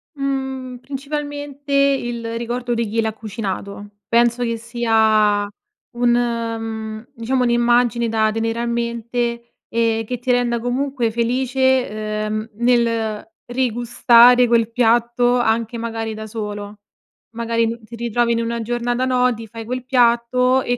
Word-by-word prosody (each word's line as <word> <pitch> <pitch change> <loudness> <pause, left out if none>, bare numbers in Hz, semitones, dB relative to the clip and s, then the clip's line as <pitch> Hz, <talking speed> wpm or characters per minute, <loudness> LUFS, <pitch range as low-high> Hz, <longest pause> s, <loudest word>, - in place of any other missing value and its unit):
Mhmm, 265 -2 -3
principalmente 285 +1 -6
il 240 -5 +1
ricordo 240 +1 -3
di 230 -1 -1
chi 225 +2 0
l'ha 220 -1 -1
cucinato. 205 -2 -6 0.2
Penso 235 +1 +2
che 230 -1 -1
sia 220 -3 +2 0.5
un 245 0 +2
mhmm, 225 -2 -2
diciamo 250 +2 0
un'immagine 240 -1 +2
da 220 -1 +2
tenere 225 +1 -2
a 235 - -1
mente, 235 0 -2 0.2
ehm, 225 -1 0
che 250 +2 -3
ti 250 0 0
renda 240 -1 +1
comunque 245 -1 -1
felice, 240 -3 0
uhm, 215 +1 -3
nel 230 -2 +1 0.2
rigustare 245 0 +5
quel 230 -1 +2
piatto 240 +1 +2
anche 230 0 0
magari 225 -1 -4
da 220 0 -7
solo. 210 -1 -6 0.6
Magari 230 0 0
n 230 0 -5
ti 235 - -10
ritrovi 235 0 0
in 230 - 0
una 230 0 -2
giornata 240 +2 -1
no, 250 -1 +2
ti 225 0 -9
fai 225 +1 -9
quel 250 +2 -4
piatto 250 +1 +3
e 245 - -1
235 Hz, 135 wpm, -20 LUFS, 225-245 Hz, 0.6 s, rigustare